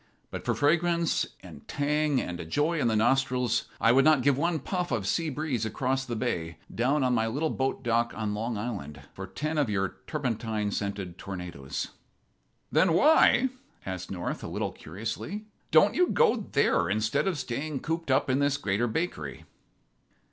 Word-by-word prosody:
"But - - -6
for - - +1
fragrance 170 +3 +2 0.2
and 70 - -12
tang 150 -1 +1
and 90 -5 -4
a - - -4
joy 150 - 0
in 120 - +2
the 110 - +2
nostrils 125 +1 +2
I 115 - +5
would 135 +2 +5
not 155 -3 +5
give 140 -1 +4
one 170 +4 +1
puff 180 +4 -3
of 100 - 0
sea 160 - 0
breeze 140 -5 -2
across 130 +4 -1
the 120 - -4
bay, 85 -9 -2 0.2
down 135 +5 +2
on 125 -1 +2
my 115 -2 +2
little 145 +7 -1
boat 130 0 -1
dock 120 -1 +1
on 105 -1 -2
Long 110 +2 -2
Island, 100 -10 -5
for - - -7
ten 155 +1 -2
of 140 -6 +1
your 95 -2 -1
turpentine 110 -7 -2
scented 100 -3 -4
tornadoes." 90 -8 -5 0.8
"Then 180 -3 +4
why," 270 - +5 0.4
asked 95 -1 -5
North, 90 -2 -4
a - - -4
little - - -2
curiously, 115 - -6 0.2
"don't - - +5
you 360 0 +3
go 220 -8 +2
there 85 -10 +2
instead 110 - +1
of 185 -5 0
staying 140 +2 -3
cooped 165 -1 -3
up 135 +2 +3
in 130 +1 +2
this 145 0 +2
Greater 105 -2 0
Bakery?" 110 - -3
125 Hz, 175 wpm, -28 LUFS, 105-150 Hz, 0.8 s, I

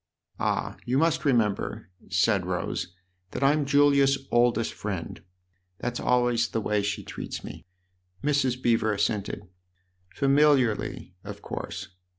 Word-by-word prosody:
"Ah, - - -1
you 125 +2 0
must 160 +1 +2
remember," 110 -5 0 0.2
said - - +2
Rose, 90 - -3 0.4
"that 140 - -4
I'm 145 +1 +3
Julia's 140 -1 +3
oldest 120 -1 +2
friend. 95 -5 -5 0.6
That's 120 +2 -3
always 120 -1 +2
the 115 - -1
way 105 -1 0
she 100 0 -2
treats - - -6
me." - - -9 0.6
Mrs. 140 -4 +1
Beever 115 -3 +2
assented. 105 -1 -2 0.3
" 90 -1 -43
Familiarly, 135 -9 +2
of - - -9
course. 95 +2 -6
120 Hz, 125 wpm, -26 LUFS, 105-140 Hz, 0.6 s, I'm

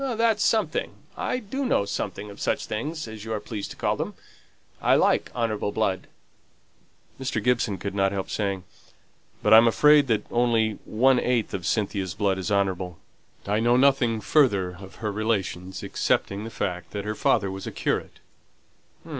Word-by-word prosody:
"That's 225 -2 +2
something. 220 -1 +1 0.2
I - - -1
do 255 +4 -4
know 245 - +2
something 100 +1 -4
of 100 - -12
such - - 0
things, 150 +7 -4
as 110 -1 -8
you 110 - -6
are 110 - -1
pleased 105 -2 -6
to - - -10
call - - 0
them. - - -4 0.7
I - - +4
like - - +2
honourable 110 -4 -1
blood." 100 -3 -1 1.1
Mr. 130 -3 -3
Gibson 120 -5 +1
could 100 0 -5
not 95 -1 +2
help 100 -1 -4
saying, 100 -3 -2 0.8
"But 105 - +5
I'm 115 +1 +9
afraid 150 +4 +5
that 110 -3 +1
only 115 -3 +1
one 125 +3 +3
eighth 120 -3 0
of 90 -4 -3
Cynthia's 100 -3 -1
blood 100 -2 0
is 95 +3 -3
honourable; 95 -3 0 0.5
I 105 +2 +1
know 120 +2 +3
nothing 125 -4 +3
further 100 -13 +3
of 95 +1 -12
her 105 - 0
relations 95 -4 -2
excepting 100 +2 -1
the - - -5
fact 90 -5 -4
that 100 -1 -4
her 105 - -2
father 100 -2 +1
was 95 0 -7
a - - -4
curate." - - -2
110 Hz, 170 wpm, -25 LUFS, 100-120 Hz, 1.1 s, I'm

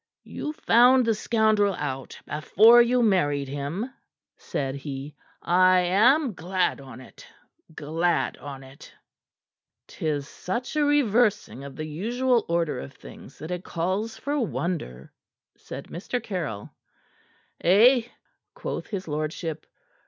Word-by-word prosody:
"You 300 - -5
found 250 -2 +5
the 225 - +2
scoundrel 215 -3 +2
out 135 -3 -5
before 220 +10 +6
you 245 +1 +2
married 145 -10 +1
him," 145 - -4 0.4
said 135 -2 -4
he. 140 +1 -7 0.3
"I 185 +1 +4
am 235 - +3
glad 180 -3 -1
on't; 130 -1 -13 0.5
glad 165 +4 0
on't!" 135 0 -11 0.9
"'Tis 145 -3 -3
such 240 - -5
a 305 - +2
reversing 230 - +1
of 140 -1 -9
the 155 - -5
usual 235 +9 0
order 170 -2 0
of 70 - -9
things - - -14
that 155 +3 -8
it 180 0 -4
calls 190 +7 -2
for 290 +1 -2
wonder," 170 - -4 0.4
said - - -9
Mr. 200 +8 -4
Caryll. 150 - -5 0.9
"Eh?" 230 +7 +5 0.5
quoth - - -5
his 190 -4 -5
lordship. 155 +1 -4
180 Hz, 115 wpm, -25 LUFS, 145-230 Hz, 0.9 s, before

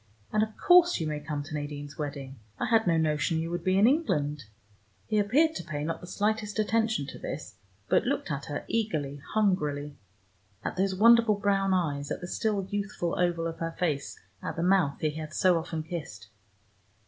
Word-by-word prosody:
"And 215 - +3
of 220 0 -2
course 355 - +6
you 160 - -1
may 150 -1 -2
come 145 -1 -4
to 150 +2 -9
Nadine's 145 -1 -5
wedding. 140 -3 -6 0.2
I - - 0
had 225 -3 +3
no 165 -1 +3
notion 155 0 +1
you 165 +1 -2
would 175 -1 -3
be 185 +1 +2
in 200 - +6
England." 150 - +1 0.6
He 215 -1 +1
appeared 285 +11 +3
to - - -6
pay 150 -3 -4
not 165 +2 -3
the 180 - -9
slightest 210 +2 -1
attention 220 -6 +1
to - - -9
this - - -7 0.3
but - - +3
looked 275 - -1
at 140 -1 -3
her 145 -2 -5
eagerly, 150 -11 -2
hungrily, 150 -9 0 0.6
at - - -3
those 190 +1 +1
wonderful 230 +1 +6
brown 195 -1 +1
eyes, 145 -5 -1
at - - -3
the 175 - -6
still 205 0 -1
youthful 200 -4 -2
oval 175 -2 +1
of 165 0 -4
her 165 0 -3
face, 150 -6 -2 0.2
at - - -4
the 165 - -2
mouth 180 -6 +3
he 155 - +1
had 155 0 -7
so 180 -3 +4
often 160 -1 -4
kissed. 150 - -7
170 Hz, 195 wpm, -28 LUFS, 150-205 Hz, 0.6 s, course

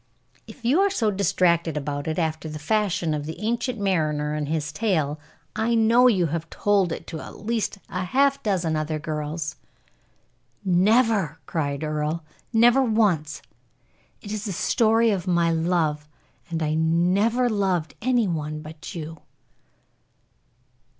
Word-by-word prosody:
"If 245 - -12
you 270 +9 +4
are 400 - +4
so 225 - 0
distracted 170 -4 +1
about 145 +1 -3
it, 155 - -2
after 160 -2 -2
the 155 - -6
fashion 175 -1 0
of 150 0 -3
the 160 - -6
Ancient 235 +2 -2
Mariner 155 -6 0
and 150 -1 -2
his 150 -1 -2
tale, 155 -6 0 0.4
I 225 +2 +1
know 230 +3 +5
you 190 -8 +3
have 165 +1 -3
told 200 -4 +1
it - - -5
to 160 - -6
at - - -11
least 225 -3 -1
half 270 +10 +1
a - - -35
dozen 180 -8 0
other 155 0 -1
girls." 155 0 -4 1.1
"Never!" 195 - +3
cried 145 -2 -2
Earle; 155 +1 -2 0.3
"never 240 +3 +5
once! 200 - +1 0.8
It 205 - -7
is 215 0 -4
the 200 - -3
story 225 +4 +3
of 185 -4 -2
my 170 -2 +2
love, 160 -3 0 0.4
and 165 -1 -2
I 155 0 0
never 180 +10 +2
loved 190 -7 0
any 245 -2 +2
one 155 -2 -3
but 155 +2 -9
you." 160 -1 -6
170 Hz, 145 wpm, -24 LUFS, 155-215 Hz, 1.1 s, know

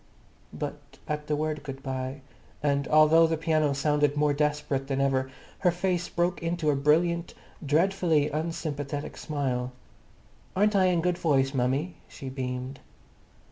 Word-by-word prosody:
But - - -5 0.3
at 150 0 -3
the 150 - +1
word 155 0 -2
"Good 135 -2 -8
bye," 130 +1 -4 0.4
and 140 -1 +1
although 155 +2 +6
the 160 0 0
piano 155 -2 +1
sounded 145 0 +1
more 150 0 +3
desperate 145 -2 -1
than 135 -1 -1
ever, 135 -1 +1 0.3
her 180 - +3
face 175 0 -1
broke 175 +1 0
into 165 -2 0
a - - +1
brilliant, 170 +5 +2 0.3
dreadfully 160 0 +2
unsympathetic 150 -2 -3
smile. 130 -5 -2 0.8
"Aren't 205 +2 +3
I 190 -1 +5
in 180 -2 +2
good 175 0 0
voice, 135 -4 +2
mummy?" 135 +7 0
she 135 - -8
beamed. 130 0 -4
150 Hz, 140 wpm, -27 LUFS, 140-165 Hz, 0.8 s, although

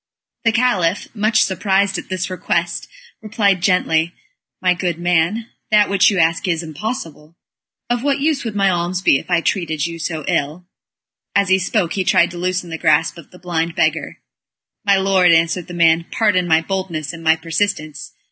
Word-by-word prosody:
The 230 - +4
Caliph, 205 -7 +1
much 215 0 +2
surprised 195 +1 0
at - - -11
this 185 0 -3
request, 185 - -2 0.3
replied 205 -4 +1
gently: 170 -2 +1 0.4
"My 180 -1 +2
good 175 -2 -2
man, 175 +6 0 0.2
that 210 -1 +4
which 200 +1 +4
you 200 - -1
ask 165 +1 +1
is 170 -1 -1
impossible. 165 - -6 0.5
Of 240 0 -1
what 280 +1 0
use 295 0 0
would 225 -3 -5
my 195 -1 +2
alms 175 +1 -2
be 135 - +4
if - - -14
I 175 -2 +2
treated 160 -5 -1
you 170 0 -6
so 160 -2 -4
ill?" 150 +5 -2 0.7
And 200 - +5
as 195 - -6
he 190 0 +4
spoke 185 -2 -1
he 190 - -1
tried 170 -1 +3
to 175 - -8
loosen 180 -1 -2
the 165 - -5
grasp 155 +2 +2
of 165 - -14
the 180 - -16
blind 170 -2 -3
beggar. - - 0 0.7
"My 200 -2 +3
lord," 190 -2 +3
answered 165 +1 +2
the 175 - -8
man, 165 0 +3
"pardon 195 -5 +1
my 160 -1 +4
boldness 170 -3 -4
and 165 0 -10
my 160 0 +4
persistence. 160 -5 -3
180 Hz, 185 wpm, -19 LUFS, 165-200 Hz, 0.7 s, And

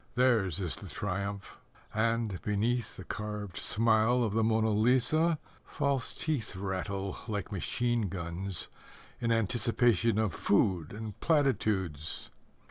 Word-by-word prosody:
Theirs 115 - +3
is 90 -4 -1
the - - -9
triumph, 100 0 -4 0.3
And, 110 -3 0
beneath 110 +3 -1
The 95 - -7
carved 105 -2 -5
smile 115 +2 +3
of 110 -3 -1
the 110 +1 +2
Mona 110 0 +2
Lisa, 130 +9 +3 0.3
False 140 -2 -1
teeth 145 - -2
Rattle 95 +1 -3
Like 105 -3 -3
machine 115 +2 0
guns, 85 0 -4 0.5
In 115 -1 0
anticipation 115 -1 +2
Of 110 -5 +1
food 95 -6 +2
and 110 -1 -7
platitudes. 105 - 0
110 Hz, 120 wpm, -31 LUFS, 95-120 Hz, 0.5 s, Theirs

